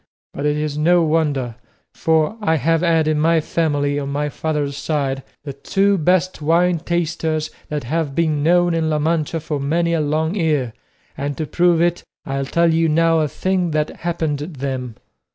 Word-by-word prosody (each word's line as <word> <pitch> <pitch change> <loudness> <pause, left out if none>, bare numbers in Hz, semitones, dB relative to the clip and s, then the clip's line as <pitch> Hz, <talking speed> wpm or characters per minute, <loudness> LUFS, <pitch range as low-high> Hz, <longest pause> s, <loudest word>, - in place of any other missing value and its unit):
But 145 - -2
it 150 0 +1
is 150 -1 -2
no 175 +2 +4
wonder, 145 -7 0 0.4
for 160 +4 +1
I 160 -6 +2
have 160 +3 +1
had 165 -3 +2
in 155 -1 +1
my 165 +1 +3
family, 145 -3 0
on 140 -1 -4
my 145 +1 -1
father's 145 -2 -2
side, 140 -2 -2 0.2
the 140 -2 -6
two 195 +8 +1
best 180 +2 +1
wine 170 +3 +2
tasters 160 -2 -2 0.2
that 150 -1 -3
have 150 +2 -2
been 155 -2 +1
known 175 +2 +3
in 165 -1 0
La 155 - +1
Mancha 160 +1 0
for 150 -2 -3
many 170 +4 0
a 165 - +1
long 155 +3 0
year, 150 - 0 0.4
and 140 0 -4
to 155 - -2
prove 170 +1 +2
it 175 0 0 0.2
I'll 135 0 -2
tell 170 +2 +2
you 165 0 +2
now 165 +1 +3
a 155 - +1
thing 185 +3 -1
that 150 0 -2
happened 160 -4 -2
them. 135 -6 -5
155 Hz, 180 wpm, -20 LUFS, 145-165 Hz, 0.4 s, no